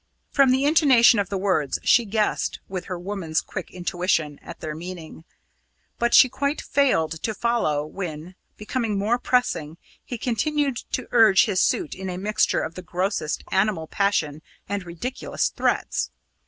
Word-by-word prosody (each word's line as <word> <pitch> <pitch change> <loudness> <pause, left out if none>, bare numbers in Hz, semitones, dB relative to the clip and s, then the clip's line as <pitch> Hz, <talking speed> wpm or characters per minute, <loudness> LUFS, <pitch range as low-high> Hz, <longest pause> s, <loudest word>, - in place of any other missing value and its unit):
From 275 -2 +4
the 265 +2 +2
intonation 270 -8 +5
of 200 - -1
the 200 - -2
words, 185 -8 0
she 240 - +4
guessed, 210 0 -1
with 185 -2 -5
her 185 - -5
woman's 175 -3 -2
quick 190 - -6
intuition, 175 -4 -1
at - - -10
their 155 -1 -5
meaning; 165 -1 -9 0.7
but 235 0 +3
she - - +8
quite 280 +3 -2
failed 165 - +1
to 220 - -2
follow, 205 -13 0
when, 165 0 -6 0.2
becoming 215 -1 -2
more 220 +5 +1
pressing, 170 -13 0 0.3
he 245 - -6
continued 275 +3 0 0.2
to 255 - -2
urge 220 -5 +6
his 195 -4 +1
suit 350 -6 +1
in 190 0 -6
a 180 - -4
mixture 210 +3 +1
of 160 - -4
the 185 - -8
grossest 180 -3 -2
animal 190 -4 +1
passion 160 -6 0 0.3
and 200 -3 -4
ridiculous 175 +10 -3
threats. - - -1
195 Hz, 155 wpm, -24 LUFS, 170-240 Hz, 0.7 s, she